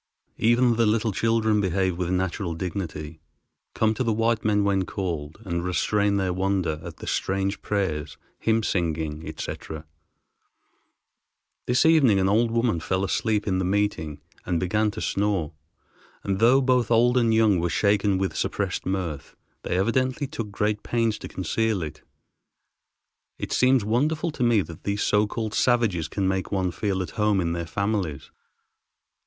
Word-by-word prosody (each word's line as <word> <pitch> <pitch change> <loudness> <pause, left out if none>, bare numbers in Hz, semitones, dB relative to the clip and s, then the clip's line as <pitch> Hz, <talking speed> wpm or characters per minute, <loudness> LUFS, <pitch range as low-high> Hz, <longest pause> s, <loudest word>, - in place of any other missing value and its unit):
Even 120 +1 +3
the 115 -2 +3
little 110 +1 +1
children 110 0 +1
behave 95 -1 0
with 90 0 -2
natural 90 -1 -1
dignity, 80 -3 -5 0.6
come 110 0 +2
to 120 - -2
the 115 - +1
white 115 +1 +1
men 105 -1 +2
when 100 -1 +2
called, 85 -6 -4
and 85 -2 -2
restrain 100 +3 +1
their 95 -2 0
wonder 95 -4 0
at - - -8
the - - -9
strange 95 +1 -1
prayers, 80 -8 -2 0.2
hymn 115 0 +1
singing, 80 -5 -1
etc. 80 -1 -6 1.8
This 125 +4 +3
evening 140 -11 +5
an 95 - +2
old 115 +4 +3
woman 115 -5 +1
fell 95 +3 -1
asleep 105 +1 0
in 95 -2 +1
the - - 0
meeting 90 -6 -1 0.2
and 85 -2 -1
began 105 +5 +1
to - - -6
snore; 100 -6 -1 0.7
and 95 -1 -1
though 125 +4 +5
both 125 -3 +2
old 120 +1 +4
and 120 -2 +3
young 110 -4 +4
were 85 +1 0
shaken 100 +3 +2
with 95 0 -2
suppressed - - -2
mirth, 90 -7 -3 0.3
they 90 - -2
evidently 130 +7 +1
took 130 -7 -5
great 105 +1 -1
pains 115 -2 0
to - - -7
conceal 100 +2 -1
it. 75 - -7 1.4
It - - -5
seems 130 -4 +3
wonderful 150 +9 0
to 145 - -9
me 120 -4 +4
that 85 -2 -11
these 100 0 -1
so 105 0 +2
called 110 0 -4
savages 115 -10 +2
can 95 +4 -1
make 95 0 -1
one 95 -3 0
feel 95 +1 -1
at - - -8
home 105 -2 +1
in 85 -2 0
their 85 -1 -4
families. 95 -4 -2
100 Hz, 160 wpm, -25 LUFS, 90-115 Hz, 1.8 s, evening